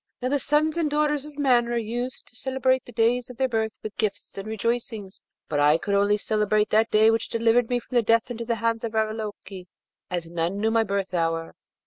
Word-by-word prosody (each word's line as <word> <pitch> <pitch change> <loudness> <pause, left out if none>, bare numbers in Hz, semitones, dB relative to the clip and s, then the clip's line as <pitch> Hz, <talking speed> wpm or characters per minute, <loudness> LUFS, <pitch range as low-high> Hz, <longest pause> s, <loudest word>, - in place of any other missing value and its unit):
Now, 255 - -2
the 285 +1 +1
sons 300 +3 +1
and 325 -3 +1
daughters 295 -1 0
of 300 -1 -12
men 250 -4 +3
are 240 0 -1
used 240 +3 -4
to - - -17
celebrate 260 0 0
the - - -11
days 235 +2 +1
of 250 - -10
their 265 - +2
birth 220 -2 -1
with 215 - -6
gifts 210 -2 -3
and 195 +1 -6
rejoicings, 220 -2 -3 0.3
but 145 - -1
I 150 +2 +5
could 200 +4 -3
only 200 +1 +3
celebrate 210 0 +1
that 220 +1 +3
day 215 +1 +5
which 225 0 -1
delivered 230 +1 +2
me 245 - +1
from 245 0 0
death 230 +2 +2
into 235 -1 -4
the 235 0 -1
hands 230 +1 -1
of 225 -1 -4
Ravaloke, 215 -4 -3 0.4
as 175 -2 -3
none 170 +3 -2
knew 220 +1 +1
my 225 0 +3
birth 200 -2 -2
hour. 165 -1 -1
225 Hz, 215 wpm, -25 LUFS, 205-245 Hz, 0.4 s, I